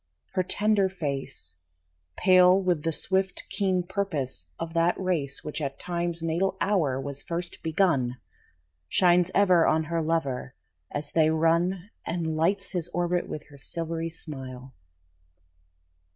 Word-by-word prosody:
Her 185 - +2
tender 205 +1 +2
face, 140 - -4 0.6
Pale 185 +1 +6
with 175 -4 +1
the 165 - 0
swift, 190 +4 -1
keen 190 -3 +1
purpose 160 - -3
of 165 0 -5
that 170 +1 +2
race 160 -8 -1
Which 150 0 -4
at 140 -1 -3
Time's 170 -1 -2
natal 180 +4 0
hour 160 -10 +1
was 140 +1 -5
first 175 +1 -5
begun, 160 -7 +1 0.7
Shines 175 -1 +4
ever 185 -4 +5
on 160 +1 +3
her 165 +1 -1
lover 140 -6 -1 0.3
as 145 0 -4
they 160 -1 +4
run 170 +5 +1
And 165 -2 -2
lights 190 +5 +1
his 175 -4 -2
orbit 175 +1 0
with 150 - -5
her 140 -1 -14
silvery 165 +2 -3
smile. 130 -5 -8
165 Hz, 135 wpm, -27 LUFS, 150-185 Hz, 0.7 s, Pale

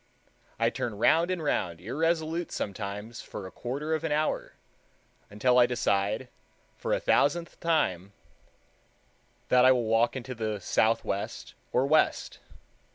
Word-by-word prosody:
I - - +2
turn 110 -4 -4
round 165 - +3
and 180 -3 -2
round 85 - -1
irresolute 160 - -1
sometimes 105 +3 -5
for 100 - -8
a 95 - -8
quarter 145 +6 -4
of 160 - -1
an - - -2
hour, 155 +1 -1 0.8
until 125 +5 +3
I 120 - +6
decide, 105 0 0 0.5
for - - -4
a - - +2
thousandth 165 +4 +1
time, 100 - 0 1.4
that 125 0 +5
I 130 - +7
will 125 -2 +2
walk 115 +3 +2
into 130 0 -5
the 110 -3 -3
southwest 110 0 -1 0.2
or 125 +2 +2
west. 155 +2 +1
125 Hz, 135 wpm, -28 LUFS, 105-155 Hz, 1.4 s, I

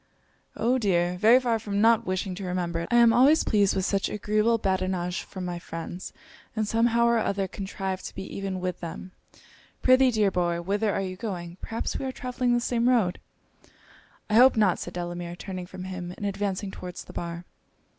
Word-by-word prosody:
'Oh, 250 +3 +2
dear! 180 -5 +1
very 225 +5 +7
far 235 -3 0
from 205 -2 -3
not 230 +1 +4
wishing 185 0 -2
to 195 +2 -7
remember 180 -2 -2
it, 170 - -4
I - - +1
am 235 -1 +6
always 275 +7 +5
pleased 205 -3 +2
with 190 - 0
such 195 -1 0
agreeable 215 +2 +1
badinage 185 -3 -1
from 185 -2 -7
my 175 -1 -4
friends, 170 +1 -7 0.4
and 215 -1 0
some 230 +2 +3
how 235 0 +3
or 235 -1 +3
other 195 -2 -1
contrive 190 0 -4
to - - -7
be 195 - -5
even 195 -1 -3
with 180 0 -3
them. 175 +2 -7 0.7
Prithee, 255 0 +6
dear 215 -4 +2
boy, 175 -2 0
whither 205 +4 0
are 195 - -1
you 185 -1 -4
going? 180 -5 -5
perhaps 225 - -3
we - - -4
are 260 - -2
travelling 250 -1 -1
the - - +2
same 240 0 +1
road?' 220 -8 +2 1.1
'I - - -3
hope 250 +2 +7
not,' 205 -4 +3
said 175 - -7
Delamere, 175 0 -4
turning 185 -1 -6
from 185 0 -8
him, 180 -1 -6
and 205 - -5
advancing 200 0 -2
towards 180 -1 -8
the - - -13
bar. 170 0 -5
195 Hz, 195 wpm, -26 LUFS, 180-225 Hz, 1.1 s, very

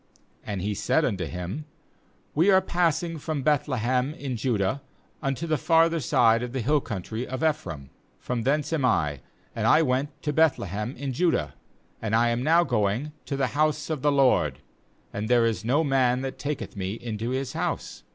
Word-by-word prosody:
18And 100 -3 -3
he 105 +3 -1
said 160 +9 +1
unto 95 -7 -1
him: 90 - -5 0.7
'We 165 +7 +3
are 190 -1 +7
passing 170 -2 0
from 145 -2 -3
Beth 150 -1 +2
lehem 130 +2 0
in 140 -6 -4
Judah 120 +2 0 0.4
unto 135 +3 -2
the 155 -3 0
farther 165 +1 +3
side 115 -4 +3
of 125 0 -5
the 130 - -1
hill 145 +5 +2
country 110 +2 -5
of 130 +4 -4
Ephraim; 85 - -2 0.3
from 125 -1 -3
thence 150 +5 0
am 155 -4 0
I, 75 - +1 0.4
and - - 0
I 160 - +6
went 135 +1 -1
to 150 - -1
Beth 160 -1 +4
lehem 105 +6 -4
in 135 0 -4
Judah, 175 +6 +1 0.5
and 110 -1 0
I 120 +1 +4
am 120 +1 0
now 165 +5 +4
going 110 +3 0 0.2
to 140 - -2
the 135 -2 +1
house 155 +1 +1
of 150 -4 -2
the 145 - +3
LORD; 125 - +3 0.6
and 105 +2 -3
"there 120 -1 +4
is 110 -5 -1
no 135 +8 +2
man 130 -3 +2
that 135 0 -5
taketh 145 -4 -4
me 95 0 -3
into 115 0 -4
his 130 0 -2
house. - - -3
130 Hz, 190 wpm, -26 LUFS, 115-150 Hz, 0.7 s, are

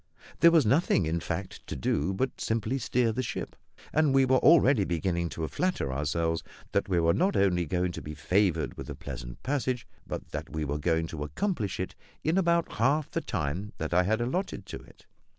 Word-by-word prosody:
There 170 - +8
was 165 -5 +4
nothing, 125 - +3
in 80 +2 0
fact, 90 +2 -5
to - - -4
do 70 +6 0
but 130 +7 -2
simply 115 +3 0
to - - -6
steer 120 -2 +2
the 125 - -1
ship; 125 - -5 0.4
and 150 -3 +3
we 135 -1 +6
were 130 0 +4
already 140 -8 +6
beginning 85 -1 -1
to 80 -1 -3
flatter 175 - -1
ourselves 80 +4 0 0.3
that 100 0 0
we 90 -2 +2
were 85 0 +3
not 190 +4 +2
only 90 -4 +2
to 90 +1 -1
be 75 0 -7
favoured 85 +1 +1
with - - -7
a - - -5
pleasant - - -8
passage, 130 -3 -1 0.2
but - - -5
that - - -5
we 80 0 -2
were 75 +1 -2
going 80 +1 +1
to 80 -2 -7
accomplish 105 - -2
it 95 - -3 0.3
in 165 +5 +2
about 170 -2 +2
half 135 +6 +2
the - - -1
time 90 +9 -3
that 80 +1 -3
I 90 - +5
had 110 +5 +1
allotted 175 +11 -2
to - - -6
it. - - -19
95 Hz, 205 wpm, -29 LUFS, 80-130 Hz, 0.4 s, There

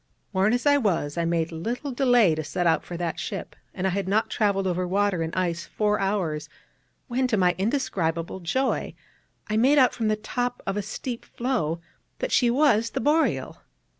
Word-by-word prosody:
Worn 190 +3 +3
as 245 +3 0
I 285 0 +5
was, 170 - 0
I 170 -1 0
made 165 -1 0
little 235 - -4
delay 245 - +4
to 155 0 -3
set 175 +3 -2
out 165 - +3
for 175 - -7
that 170 -1 -3
ship; - - -5 0.2
and 190 - -4
I 190 - +2
had 195 +1 -2
not 210 +3 +1
travelled 200 -3 +1
over 180 0 0
water 195 -1 +1
and 160 0 -2
ice 170 -2 -1
four 210 -1 0
hours 185 -7 -1 0.6
when, 255 0 0
to 220 - +1
my 180 -2 +4
in 200 +4 +2
describable 170 - -2
joy, 255 +10 -1 0.5
I 215 - 0
made 265 +6 +4
out 255 -3 +5
from 225 -2 -1
the 215 - +2
top 245 +3 -3
of 195 - -2
a 205 - 0
steep 235 +4 -5
floe 225 - -2 0.4
that - - -3
she 245 - +4
was 235 -4 +3
the - - -3
Boreal. 305 +6 +1
205 Hz, 195 wpm, -25 LUFS, 175-245 Hz, 0.6 s, I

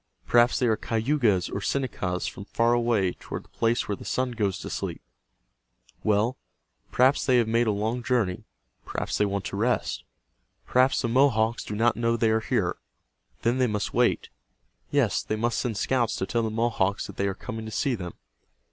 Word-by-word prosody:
Perhaps 120 0 +4
they 125 - +1
are 110 -2 +3
Cayugas 115 -4 +1
or 100 - -4
Senecas 100 -9 -2
from 100 - -6
far 115 +3 +2
away 115 -6 +2
toward - - -7
the - - -25
place 115 +1 0
Where 105 - -1
The - - -11
Sun 130 -1 -1
Goes 105 -5 -1
To - - -7
Sleep. - - -4 1.0
Well, 110 +4 +2 0.5
perhaps 130 +3 +4
they 130 -2 +3
have 120 -2 +3
made 115 +1 +2
a - - +3
long 110 +4 -1
journey. 120 -8 0 0.4
Perhaps - - -3
they 105 - +3
want 100 -1 -3
to - - -4
rest. 120 +3 0 0.6
Perhaps 130 +2 +3
the - - +1
Mohawks 115 -2 +2
do 105 - -5
not 115 +2 +3
know 115 0 +1
they 115 -1 +2
are 110 - +3
here. - - -1 0.7
Then 120 +3 +2
they 130 - +3
must 105 -2 -2
wait. - - +2 0.6
Yes, 140 -7 +2
they 110 - -3
must 115 +2 0
send 115 -5 -2
scouts 120 0 +1
to 95 - -2
tell 115 +4 0
the 110 - -1
Mohawks 110 -3 0
that - - -10
they 100 - +1
are 95 - -2
coming 110 +2 -6
to 110 - -7
see 140 +3 0
them. 90 -7 -5
115 Hz, 190 wpm, -26 LUFS, 105-120 Hz, 1.0 s, Perhaps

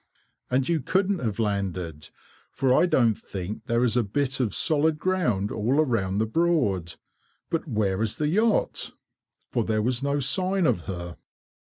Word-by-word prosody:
"And 130 +1 +1
you 170 -2 +1
couldn't 190 +6 0
have 110 -5 -2
landed, 95 -7 -3 0.4
for 130 -1 +2
I 175 - +4
don't 120 -9 +3
think 100 +6 -7
there 115 0 +2
is 120 -2 +2
a 120 - +4
bit 135 +6 -1
of 115 -7 0
solid 155 0 +2
ground 150 - 0
all 115 +5 0
round 100 -6 0
the 110 - +2
Broad. 110 - 0 0.6
But 165 0 -1
where 105 -6 0
is 110 -2 0
the 150 - -1
yacht?" 215 +7 +1 0.6
For 120 - +1
there 110 -1 0
was 125 +2 0
no 140 +1 0
sign 185 +7 +2
of 90 - +2
her. 85 -2 -6
120 Hz, 165 wpm, -26 LUFS, 100-155 Hz, 0.6 s, I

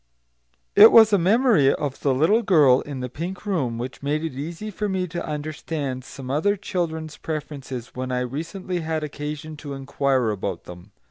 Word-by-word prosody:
It 210 +2 +10
was 220 -2 +7
a 200 - +5
memory 195 - +4
of 145 -3 -4
the 140 - +1
little 160 - +3
girl 150 - +5
in 140 -3 -6
the 125 - -3
pink 175 - -6
room 140 - -1
which 125 +2 -6
made 150 +2 -1
it 160 - -3
easy 165 +10 -6
for 210 +1 -3
me 190 -1 -1
to 175 +1 -5
understand 150 -3 -4
some 130 0 -8
other 180 +9 +2
children's 160 -5 -3
preferences 140 -6 -6
when 130 0 -4
I 125 0 0
recently 165 +8 -4
had 160 -1 -2
occasion 150 +1 -6
to 145 -1 -7
inquire 135 -3 0
about 95 -3 -4
them. 90 +3 -12
150 Hz, 180 wpm, -23 LUFS, 130-175 Hz, -, It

